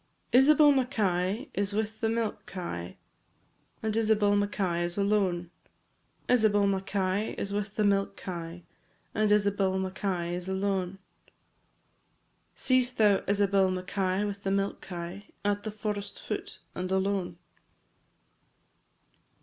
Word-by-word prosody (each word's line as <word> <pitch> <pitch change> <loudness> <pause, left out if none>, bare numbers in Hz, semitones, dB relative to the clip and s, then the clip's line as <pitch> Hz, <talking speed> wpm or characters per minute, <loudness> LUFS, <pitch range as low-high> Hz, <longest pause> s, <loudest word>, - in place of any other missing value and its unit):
Isabel 290 +3 +7
Mackay 220 - 0
is 200 0 -1
with 220 +1 -2
the 225 - +2
milk 225 -1 -2
kye, 90 - -6 0.9
And 220 -1 -1
Isabel 215 -2 +3
Mackay 195 -4 0
is 175 +1 -3
alone; 195 -4 +1 0.8
Isabel 215 -4 +4
Mackay 195 +1 0
is 200 - -3
with 205 0 -3
the 215 - +1
milk 200 -1 +1
kye, 170 -1 -6 0.5
And 215 0 +2
Isabel 200 -2 +2
Mackay 185 -2 -2
is 180 +1 -4
alone, 190 -1 -1 1.6
&c. 255 -1 +4
Seest 250 0 -2
thou 205 -3 +4
Isabel 200 -1 +3
Mackay 185 +1 -1
with 200 -1 -4
the 195 - -2
milk 195 0 0
kye, 180 +3 -7 0.2
At 205 0 +1
the 215 - -4
forest 205 -1 -4
foot - - -5 0.2
and 185 +1 -4
alone? 190 -1 0
200 Hz, 120 wpm, -29 LUFS, 185-210 Hz, 1.6 s, Isabel